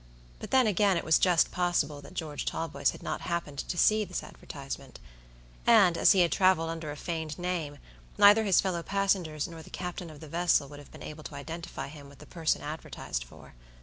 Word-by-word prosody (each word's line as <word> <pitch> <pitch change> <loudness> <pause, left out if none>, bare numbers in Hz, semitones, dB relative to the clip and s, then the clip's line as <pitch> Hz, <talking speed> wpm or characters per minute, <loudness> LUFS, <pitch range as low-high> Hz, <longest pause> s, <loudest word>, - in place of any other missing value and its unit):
But - - -7
then, 260 -1 +4
again, 200 -2 +3
it - - -2
was 160 - +4
just 175 -4 +3
possible 165 -5 0
that 145 +6 -13
George 155 -4 -4
Talboys 140 -4 -1
had - - -7
not - - -3
happened 170 -5 -3
to 175 - -4
see 215 +4 +4
this 185 -3 -5
advertisement; 135 -2 -9 0.7
and, 205 -7 +6
as - - +6
he 190 - +4
had 170 - +3
traveled 185 -4 +3
under 165 -2 -5
a 145 - -5
feigned 160 -2 -4
name, 175 -5 -3 0.4
neither 205 +2 +7
his 195 -5 +4
fellow 180 -3 -1
passengers 185 -6 0
nor 165 -1 -10
the - - -13
captain 180 -1 -6
of 155 -2 -12
the 155 - -10
vessel 165 -2 +2
would 145 0 -10
have 145 - -14
been - - -11
able 155 0 -8
to 145 - -8
identify 165 +4 -6
him 140 -1 -11
with 140 - -16
the - - -13
person 165 -3 -1
advertised 150 - -5
for. - - -15
165 Hz, 210 wpm, -29 LUFS, 150-180 Hz, 0.7 s, neither